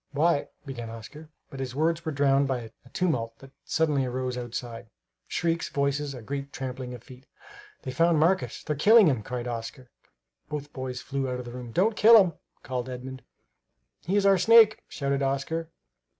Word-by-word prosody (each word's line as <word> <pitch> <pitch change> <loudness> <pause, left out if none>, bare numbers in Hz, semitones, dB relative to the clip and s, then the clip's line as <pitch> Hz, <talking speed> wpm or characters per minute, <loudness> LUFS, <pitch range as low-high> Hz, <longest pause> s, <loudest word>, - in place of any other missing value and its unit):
"Why" 150 0 +2 0.2
began 120 -5 -6
Oscar; 115 +8 -10 0.2
but 135 - -8
his 130 -1 -4
words 165 +3 +1
were 160 - -2
drowned 140 -1 +3
by 120 -4 -3
a - - -16
tumult 125 -10 -1
that 135 0 -15
suddenly 150 -4 +1
arose 125 0 -3
outside; 120 -2 -6 0.4
shrieks, 170 0 -1
voices, 140 0 -1
a 120 - -9
great 140 +3 -5
trampling 125 -1 -5
of 120 - -13
feet. 130 +1 -15 0.6
"They've 130 -1 -6
found 165 +1 +3
Marcus! 185 +4 +1
They're 150 - -2
killing 215 +9 +7
him!" 135 -9 +2
cried 125 +2 -5
Oscar. 120 +2 -6 0.6
Both 145 -1 -6
boys 130 -1 -5
flew 135 -1 -2
out 125 - -2
of 125 - -7
the 120 - -8
room. 125 -1 -8
"Don't 205 - +2
kill 225 +2 +8
him!" 185 -4 +3 0.3
called 130 -1 -4
Edmund. 130 +1 -7 0.8
"He 185 +5 -1
is 205 -1 +3
our 195 -1 +5
snake!" 220 +2 +6
shouted 140 -1 -2
Oscar. 140 +4 -2
135 Hz, 180 wpm, -27 LUFS, 125-160 Hz, 0.8 s, kill